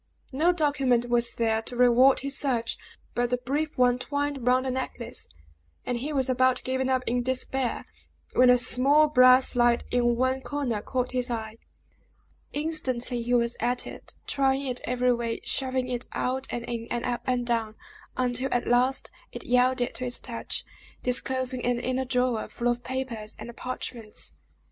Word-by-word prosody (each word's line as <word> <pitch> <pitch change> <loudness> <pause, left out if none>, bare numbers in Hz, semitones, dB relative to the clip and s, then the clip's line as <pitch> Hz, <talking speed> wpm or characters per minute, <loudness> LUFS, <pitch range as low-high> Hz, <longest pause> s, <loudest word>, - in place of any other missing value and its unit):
No 310 +7 +3
document 275 -7 +1
was 235 -1 +3
there 225 -1 +1
to 245 - -5
reward 250 +2 +5
his 275 0 -2
search, 245 -5 0 0.4
but 245 0 0
the 250 - +1
brief 285 +5 -3
one 250 0 +3
twined 285 -2 -2
round 255 +1 +3
the 260 - -1
necklace; 250 -2 -4 0.6
and 245 -1 -2
he 285 +5 -4
was 270 -3 0
about 255 0 +2
giving 260 0 -1
up 260 -1 +1
in 245 +1 0
despair, 260 0 -1 0.5
when 250 0 +5
a 250 - +7
small 265 +5 +4
brass 255 -2 +6
slide 240 -1 +2
in 240 -1 +2
one 260 +2 0
corner 265 -7 -2
caught 250 +2 -2
his 250 -1 0
eye. 220 -2 -4 0.9
Instantly 260 -6 -2
he 240 +1 +1
was 235 0 +1
at 245 +2 0
it, - - -9
trying 270 0 +1
it 250 -2 -3
every 250 0 +2
way, 235 -1 -2
shoving 260 -1 -1
it 250 -1 -4
out 260 +1 -2
and 235 -1 -4
in, 235 -1 -4
and 240 0 -2
up 245 -1 -1
and 250 -1 0
down, 225 -2 -1 0.4
until 255 +1 0
at 245 0 0
last 250 +2 +2 0.2
it - - -8
yielded 250 0 +2
to - - -6
his 245 -1 +1
touch, 235 -2 -3 0.4
disclosing 255 0 0
an 245 -1 +1
inner 255 +1 -1
drawer, 250 -3 0
full 240 0 -2
of 240 0 -1
papers 245 -5 -5
and 235 0 -9
parchments. 235 -3 -6
250 Hz, 170 wpm, -27 LUFS, 240-260 Hz, 0.9 s, a